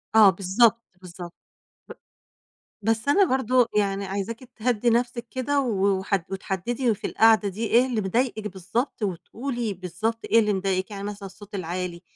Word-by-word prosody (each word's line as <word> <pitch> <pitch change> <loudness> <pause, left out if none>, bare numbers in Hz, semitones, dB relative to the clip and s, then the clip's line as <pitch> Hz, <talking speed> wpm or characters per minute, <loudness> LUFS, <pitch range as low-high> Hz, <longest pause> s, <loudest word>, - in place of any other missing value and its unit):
آه، 215 -3 +9
بالضبط، 205 +5 +3 0.2
بالضبط. 175 -1 -9 1.5
ب 225 - +1
بس 225 +4 -1
أنا 390 +8 +5
برضو 255 -4 +2
يعني 200 -1 +1
عايزاكِ 200 +4 -4 0.2
تِهَدِّي 235 0 +1
نفسِك 240 0 0
كده، 280 +2 0
و 200 -6 +1
وحد 190 -2 -1
وتحدِّدي 215 +6 -1
في 205 - -5
القعدة 220 -2 +4
دي 215 +4 -3
إيه 240 +3 +4
اللي 240 -4 -1
مضايقِك 215 +2 -1
بالضبط، 205 +6 -3
وتقولي 225 +4 -3
بالضبط 215 +6 -3
إيه 230 - +6
اللي 210 -1 +1
مضايقِك، 190 +1 -1
يعني 200 -1 -6
مثلًا 205 -1 -6
الصَّوت 205 +2 -13
العالي، 180 -1 -4
210 Hz, 155 wpm, -25 LUFS, 190-235 Hz, 1.5 s, آه